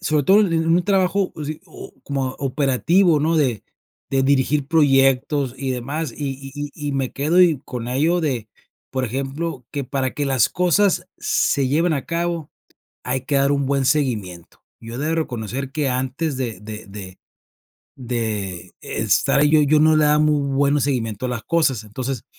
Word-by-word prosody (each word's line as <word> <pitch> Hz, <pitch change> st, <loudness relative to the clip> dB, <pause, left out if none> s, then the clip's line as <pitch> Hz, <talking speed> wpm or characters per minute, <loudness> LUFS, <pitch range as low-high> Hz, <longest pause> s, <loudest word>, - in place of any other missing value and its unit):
Sobre 155 Hz, -5 st, +1 dB
todo 200 Hz, +2 st, +6 dB
en 165 Hz, -5 st, +1 dB
un 175 Hz, +2 st, +3 dB
trabajo 195 Hz, -1 st, +1 dB
así 155 Hz, 0 st, -5 dB
o -, -, -11 dB
como 135 Hz, -2 st, -2 dB
operativo, 145 Hz, +5 st, +2 dB
¿no?, 160 Hz, +2 st, +1 dB
de 125 Hz, -9 st, 0 dB, 0.5 s
de 135 Hz, -1 st, +2 dB
dirigir 140 Hz, +1 st, +2 dB
proyectos 135 Hz, -2 st, +2 dB
y 135 Hz, -1 st, -3 dB
demás, 135 Hz, +3 st, -3 dB
y 140 Hz, -2 st, -3 dB
y 135 Hz, -1 st, -9 dB, 0.2 s
y 150 Hz, -2 st, -4 dB
y -, -, -2 dB
me 135 Hz, -2 st, -2 dB
quedo 155 Hz, +6 st, +1 dB, 0.3 s
con 120 Hz, -2 st, -6 dB
ello 160 Hz, +7 st, +1 dB
de, 125 Hz, -8 st, -2 dB, 0.4 s
por 130 Hz, -1 st, -1 dB
ejemplo, 135 Hz, +3 st, -4 dB
que 140 Hz, -3 st, -3 dB
para 130 Hz, 0 st, -2 dB
que 145 Hz, -1 st, -2 dB
las 130 Hz, -4 st, +3 dB
cosas 180 Hz, 0 st, +2 dB
se 140 Hz, -2 st, +1 dB
lleven 160 Hz, +3 st, +2 dB
a 140 Hz, -, -3 dB
cabo, 170 Hz, -2 st, -2 dB, 0.5 s
hay 125 Hz, 0 st, -2 dB
que 140 Hz, -, 0 dB
dar 140 Hz, +1 st, +3 dB
un 140 Hz, -1 st, +1 dB
buen 140 Hz, 0 st, +1 dB
seguimiento, 105 Hz, -, -1 dB, 0.2 s
yo 115 Hz, +1 st, -9 dB
he -, -, -5 dB
de 155 Hz, +3 st, -1 dB
reconocer 130 Hz, -2 st, -3 dB
que 150 Hz, -4 st, 0 dB
antes 130 Hz, +3 st, -2 dB
de 115 Hz, -7 st, -4 dB
de 105 Hz, -1 st, -8 dB
de 95 Hz, -2 st, -9 dB, 0.8 s
de 110 Hz, -7 st, -4 dB
estar 140 Hz, -, +1 dB
ahí, 150 Hz, -, +4 dB
yo 155 Hz, -1 st, +5 dB
yo 150 Hz, +1 st, +3 dB
no 155 Hz, 0 st, +5 dB
le 155 Hz, -, +4 dB
daba 150 Hz, 0 st, +4 dB
muy 150 Hz, -1 st, +3 dB
bueno 140 Hz, +1 st, +2 dB
seguimiento 125 Hz, -4 st, -1 dB
a -, -, -3 dB
las 115 Hz, -3 st, -4 dB
cosas, 145 Hz, -9 st, +1 dB
entonces, 125 Hz, +3 st, -5 dB
140 Hz, 175 wpm, -21 LUFS, 125-155 Hz, 0.8 s, todo